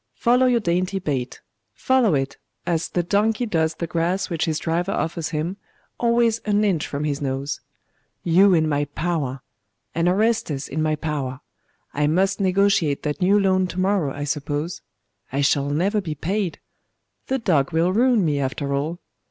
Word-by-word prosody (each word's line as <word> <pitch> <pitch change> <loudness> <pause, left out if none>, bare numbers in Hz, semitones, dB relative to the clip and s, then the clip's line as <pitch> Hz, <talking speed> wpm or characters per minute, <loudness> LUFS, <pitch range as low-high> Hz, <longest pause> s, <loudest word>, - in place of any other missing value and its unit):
Follow 250 +2 +3
your 245 -2 +3
dainty 185 0 0
bait! 140 -9 -3 0.3
follow 255 - +3
it, 135 0 -2 0.3
as 165 -1 -1
the 175 - 0
donkey 215 +6 +1
does 160 -6 0
the 170 - -3
grass 175 +4 -1
which 165 - 0
his 160 -2 -1
driver 175 +4 -1
offers 165 0 -2
him, 165 +4 -3 0.4
always 235 -1 +2
an 210 -1 +1
inch 180 -7 0
from 140 +1 -3
his 145 -1 -2
nose.... 140 +1 -3 0.6
You 185 +3 +5
in 160 -1 +2
my 145 -1 +1
power! 145 -3 -2 0.5
and 170 +2 +2
Orestes 190 -8 0
in 155 +3 -3
my 155 0 +1
power!.... 145 -4 -3 0.5
I 145 +1 +1
must 190 +6 +1
negotiate 195 -6 +2
that 150 +4 -3
new 195 +3 +4
loan 185 -1 +2
to 180 - -5
morrow, 185 -6 +1
I 145 +1 -5
suppose.... 145 +3 -3 0.5
I 140 +2 0
shall 140 0 +2
never 195 +8 +1
be 160 -5 -4
paid. 185 +3 -2 0.7
The 265 - +1
dog 170 - +1
will 170 +3 +2
ruin 235 -2 +3
me, 145 -3 +1
after 140 +1 -2
all! 155 +5 -2
170 Hz, 170 wpm, -23 LUFS, 145-195 Hz, 0.7 s, You